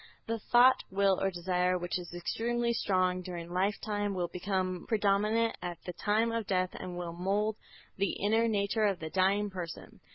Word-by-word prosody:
"The 230 0 -2
thought, 245 +4 +5
will 195 0 +2
or 195 - +2
desire 180 0 0
which 175 +1 -2
is 175 - -9
extremely 235 +7 -1
strong 185 -4 +1
during 175 -1 -7
lifetime, 205 +1 -1
will 175 -2 -1
become 185 -1 -2
predominant 215 +2 +2
at 175 -1 -4
the 180 - -4
time 215 +6 +1
of 230 -2 -2
death 185 -1 +1
and 180 -1 -6
will 175 -1 -4
mould 200 +5 0 0.4
the 195 0 +1
inner 225 +3 +2
nature 210 0 +1
of 200 -3 +1
the 160 -1 -6
dying 195 +3 +2
person. 175 -3 -7
195 Hz, 170 wpm, -31 LUFS, 180-210 Hz, 0.4 s, thought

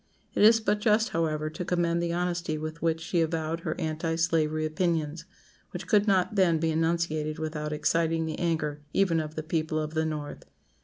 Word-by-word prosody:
It - - 0
is 225 +2 +7
but 210 -1 0
just, 215 +1 +3
however, 155 -2 -1
to 180 - -5
commend 170 -1 0
the 170 0 -1
honesty 175 -2 -1
with 155 +1 -6
which 165 -1 +1
she 170 +1 0
avowed 160 0 -1
her - - -4
anti 160 +1 -1
slavery 155 -2 +1
opinions, 160 -1 -1 0.4
which 180 -2 -7
could 205 +3 +3
not 195 +1 +2
then 185 -5 +3
be 160 0 0
enunciated 160 -1 0
without 155 -1 -3
exciting 165 +1 +1
the 160 - -4
anger 150 -3 -1
even 185 -4 +3
of 155 0 -5
the 155 - -3
people 155 0 -1
of 155 0 -2
the 160 0 0
North. 150 -2 -5
165 Hz, 190 wpm, -28 LUFS, 155-175 Hz, 0.4 s, is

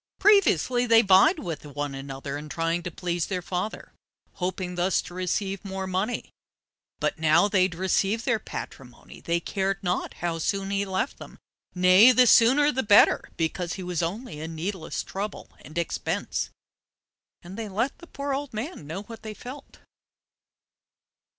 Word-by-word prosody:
Previously 255 - +4
they 230 0 +6
vied 195 - +6
with 170 - -5
one 145 -1 -4
another 135 +1 -6
in 150 +1 -7
trying 165 +2 -1
to 180 - -5
please 175 -1 -2
their 180 -2 -3
father, 185 +4 -4 0.4
hoping 180 0 -3
thus 180 +2 +1
to - - -11
receive 190 +2 -2
more 190 -1 -4
money, 190 +6 -2 0.7
but - - -1
now 160 +5 +4
they 200 -3 +2
had 185 -2 +1
received 195 +5 0
their 240 -4 +1
patrimony, 125 - -9
they 170 0 0
cared 195 +2 -1
not 180 0 -2
how 170 -1 -3
soon 195 +3 -1
he 200 0 0
left 190 +7 -2
them—nay, 185 +6 +3
the 255 0 +6
sooner 265 +6 +6
the 265 - -1
better, 205 -4 +5
because 170 +1 -2
he 190 - -6
was 180 -2 -2
only 175 - -4
a 160 - -4
needless 165 +2 -4
trouble 200 +2 -6
and 155 +5 -11
expense. 170 - -2 0.9
And 175 +2 -9
they 220 -1 -5
let 225 +8 -2
the 345 - -13
poor 280 -2 -4
old 275 -3 -4
man 220 - -5
know 180 +6 -5
what 225 +1 -11
they 215 -1 -7
felt. 265 +5 -10
190 Hz, 160 wpm, -26 LUFS, 170-220 Hz, 0.9 s, they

